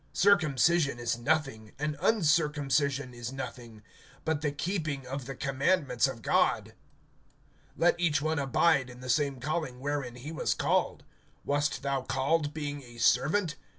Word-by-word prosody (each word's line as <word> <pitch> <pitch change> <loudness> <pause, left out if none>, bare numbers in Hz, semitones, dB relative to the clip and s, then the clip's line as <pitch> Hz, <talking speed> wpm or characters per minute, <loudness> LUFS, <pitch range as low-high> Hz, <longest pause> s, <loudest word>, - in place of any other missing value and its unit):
(19)Circumcision 165 - +3
is 120 -1 -1
nothing, 125 -4 -1
and 150 +1 -2
uncircumcision 150 - +1
is 120 0 -6
nothing; 120 -5 -8 0.4
but 160 -2 0
the 150 -2 0
keeping 155 -3 -3
of 135 0 -5
the 135 - -5
commandments 135 - +1
of - - -7
God. - - +1 1.0
(20)Let 175 +1 +4
each 165 -5 +2
one 155 +1 -1
abide 140 0 +2
in 125 0 -12
the 130 - -7
same 140 -2 0
calling 145 -2 -3
wherein 140 -3 -3
he 130 +5 -8
was 165 - -1
called. - - 0 0.4
(21)Wast 145 +1 0
thou 140 -1 -1
called 145 +4 0
being 145 -2 -5
a 120 -2 -14
servant? 155 - +2
140 Hz, 145 wpm, -29 LUFS, 130-155 Hz, 1.0 s, 20)Let